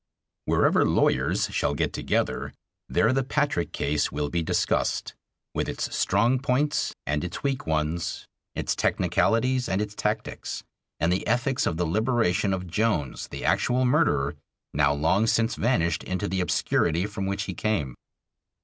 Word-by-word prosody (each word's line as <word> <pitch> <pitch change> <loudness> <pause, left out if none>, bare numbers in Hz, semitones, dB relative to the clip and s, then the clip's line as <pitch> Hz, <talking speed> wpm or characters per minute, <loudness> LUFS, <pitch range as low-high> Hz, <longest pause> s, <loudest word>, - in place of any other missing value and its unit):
Wherever - - +3
lawyers - - +2
shall - - 0
get - - -1
together, - - -1 0.3
there 115 +3 +3
the 135 0 +1
Patrick 145 - 0
case 75 +1 0
will 75 0 -2
be 85 +1 -1
discussed 80 - 0 0.4
with - - -1
its - - -3
strong 115 +7 +2
points 140 +3 0
and 75 +3 -1
its 90 0 -5
weak 135 -8 -1
ones, 80 +2 -1 0.3
its - - -1
technicalities 125 +2 +1
and 95 - +1
its 105 0 -3
tactics, 105 +1 -3 0.4
and 85 +3 +2
the 95 - -2
ethics 125 +3 +1
of 80 - -1
the 90 - 0
liberation 110 +1 +1
of 95 -1 -2
Jones, 85 - -1
the - - -6
actual 125 +1 +2
murderer, 100 - +2 0.4
now 70 0 +3
long 80 +9 +2
since 115 +1 +2
vanished 85 -9 +1
into 95 +2 -2
the 95 -1 -1
obscurity 85 0 +1
from 100 -2 -4
which 100 +1 -1
he - - -5
came. 90 - -1
100 Hz, 150 wpm, -26 LUFS, 80-120 Hz, 0.4 s, Wherever